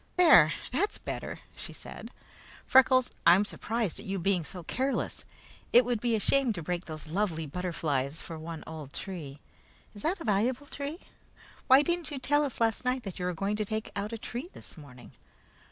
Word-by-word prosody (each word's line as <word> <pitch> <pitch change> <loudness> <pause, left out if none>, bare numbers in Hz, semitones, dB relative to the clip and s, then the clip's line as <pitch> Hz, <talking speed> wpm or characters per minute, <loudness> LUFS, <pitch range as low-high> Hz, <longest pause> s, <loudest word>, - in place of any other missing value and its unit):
"There! 275 - +8 0.2
That's 400 +12 0
better," - - -6
she - - -8
said. - - -9 0.6
"Freckles, 255 -1 +5 0.2
I'm 180 +5 +7
surprised 220 -2 -2
at - - -10
your 195 0 -2
being 180 -1 +1
so 175 +4 -7
careless. 265 +10 -2 0.5
It 245 0 +7
would 240 -2 0
be 235 -2 +2
a - - +1
shame 265 +1 +3
to 170 -5 -6
break 175 +2 -3
those 155 -2 -7
lovely 165 -1 -1
butterflies 155 -3 -2
for 165 -1 -7
one 160 0 -7
old 155 -4 -8
tree! 150 -8 -6 0.5
Is 205 - -11
that 355 - 0
a - - -6
valuable 240 +6 +1
tree? 285 +4 -6 0.7
Why 265 +2 +7
didn't 345 0 -1
you 290 - -4
tell 290 +3 +2
us 275 -4 -4
last 225 0 +1
night 250 -7 -2
you 180 - -2
were 180 -1 -1
going 200 +4 -1
to 215 - 0
take 220 +1 -3
out 205 +2 -2
a 230 - -4
tree 245 +8 -6
this - - -11
morning? 140 -5 -13
205 Hz, 185 wpm, -29 LUFS, 165-255 Hz, 0.7 s, There